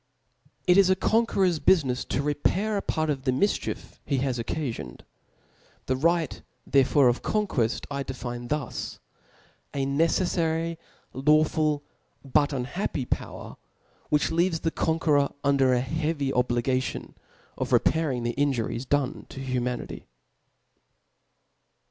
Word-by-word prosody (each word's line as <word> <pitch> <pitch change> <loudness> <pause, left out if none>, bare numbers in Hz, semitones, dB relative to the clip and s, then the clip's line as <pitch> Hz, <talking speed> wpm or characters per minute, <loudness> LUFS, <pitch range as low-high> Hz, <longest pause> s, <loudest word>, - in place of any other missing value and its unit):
It 180 +2 +6
is 195 -2 +5
a 190 - +5
conqueror's 190 -4 +2
biifinefs 140 -5 +2
to 140 - -1
repair 185 +9 0
a 200 - 0
part 155 -4 0
of 135 -2 -3
the - - +1
miichief 200 +11 -1
he 140 - -1
to 130 - 0
occifioned. 120 - -3 0.8
The 130 - 0
rijght 165 +3 +1 0.3
thero 135 0 +4
Ibre 120 - +5
6f - - -11 0.3
co'iiqueft 115 - 0
I 140 0 -2
define 120 -2 -5
thus: 145 -2 -3 0.8
a 135 -1 0
nece*fikry, 165 +2 +1 0.4
)aw 130 - -6 0.2
jRil^ 155 -2 0 0.4
but 145 +2 +3
iH^iappy 135 +1 -3
power, - - -4 0.5
which 150 +1 +2
leaves 165 0 +1
the 165 - 0
con 160 0 0
^iklror 145 -4 +2
under 140 -2 +3
a 125 -1 +3
heavy 150 0 -1
obligation 125 +1 0 0.4
of - - -3
repahihg 145 -7 +2
the 120 0 -1
^Juries 130 -3 -1
dotne 145 0 -1
to - - -9
humanity. 125 -2 -3
140 Hz, 130 wpm, -26 LUFS, 130-160 Hz, 0.8 s, It